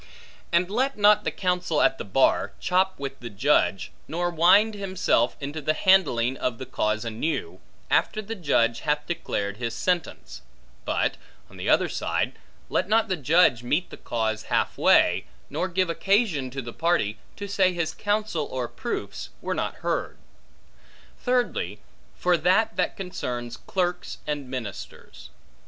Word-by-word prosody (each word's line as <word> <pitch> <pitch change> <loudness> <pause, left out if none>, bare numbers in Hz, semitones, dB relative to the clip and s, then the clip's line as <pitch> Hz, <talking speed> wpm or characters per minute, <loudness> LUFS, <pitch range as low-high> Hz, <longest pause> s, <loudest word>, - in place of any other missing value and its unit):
And 170 +1 +3
let 260 +4 0
not 210 0 +5
the - - +2
counsel 180 -4 0
at 165 -5 +3
the - - -3
bar, 130 +7 +2
chop 185 +1 +1
with 135 -1 -6
the 120 - -7
judge, 100 - +1 0.2
nor 175 +2 -1
wind 185 +7 +5
himself 185 - 0
into 145 +2 -5
the 155 +2 +1
handling 135 -10 +3
of 125 -2 -2
the 130 - -6
cause 110 -3 -1
anew, 155 - -3 0.3
after 215 - +2
the 215 +1 -5
judge 120 - +1
hath 150 -1 -1
declared 100 - -3
his 115 -1 -3
sentence; 165 - -2 0.4
but, - - 0 0.3
on - - -13
the - - -3
other - - +4
side, - - -1 0.3
let - - 0
not 220 0 +3
the 185 - +1
judge 150 -4 +4
meet 150 +9 -1
the - - -7
cause 110 -2 -2
half - - 0
way, - - +4 0.3
nor 185 - -1
give 185 0 0
occasion 195 - +1
to 135 +1 -5
the 120 0 -7
party, 160 -12 0 0.2
to 200 - -6
say 190 -2 +3
his 170 -3 -2
counsel 205 -7 -1
or 125 -2 -3
proofs - - -5
were - - -2
not - - -2
heard. - - -1 1.0
Thirdly, 250 -1 0 0.4
for 180 -1 +2
that 215 +6 +2
that - - -1
concerns 125 -11 -4
clerks 180 +2 -2
and 145 -3 -3
ministers. 110 - -8
165 Hz, 155 wpm, -25 LUFS, 125-190 Hz, 1.0 s, not